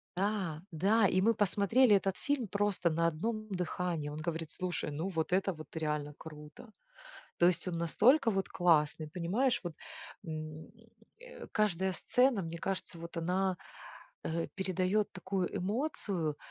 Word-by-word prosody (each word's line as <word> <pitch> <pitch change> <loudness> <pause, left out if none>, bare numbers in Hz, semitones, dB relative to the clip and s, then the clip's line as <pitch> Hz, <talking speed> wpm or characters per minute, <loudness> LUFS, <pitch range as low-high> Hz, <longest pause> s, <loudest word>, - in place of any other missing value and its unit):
Да, 185 -5 -1
да, 200 +6 +4
и 185 0 +2
мы 225 +4 +4
посмотрели 205 +4 +4
этот 195 -1 +1
фильм 285 -6 -1
просто 200 -3 +1
на 165 +1 +2
одном 215 +7 -2
дыхании. 180 -4 -2
Он 150 - -6
говорит: 165 0 -3
"Слушай, 180 -4 -3
ну 160 +6 -2
вот 165 -2 -2
это 190 0 +2
вот 155 -1 -10
реально 150 -2 -2
круто!" 155 +8 -11 0.7
То 175 - +6
есть 180 +1 +2
он 170 - -2
настолько 225 - +4
вот 195 -1 -1
классный, 155 -3 +2
понимаешь 190 - 0
вот! 175 -3 -5 0.5
М, 155 -1 -6 0.5
э, - - -10
каждая 190 -3 +1
сцена, 250 0 +2
мне 165 0 -5
кажется, 185 -1 -3
вот 170 +1 -8
она, 180 +2 0 0.7
э, 165 +1 -1
передает 190 +2 0
такую 185 -1 -2
эмоцию. 195 - -1
180 Hz, 145 wpm, -33 LUFS, 165-205 Hz, 0.7 s, То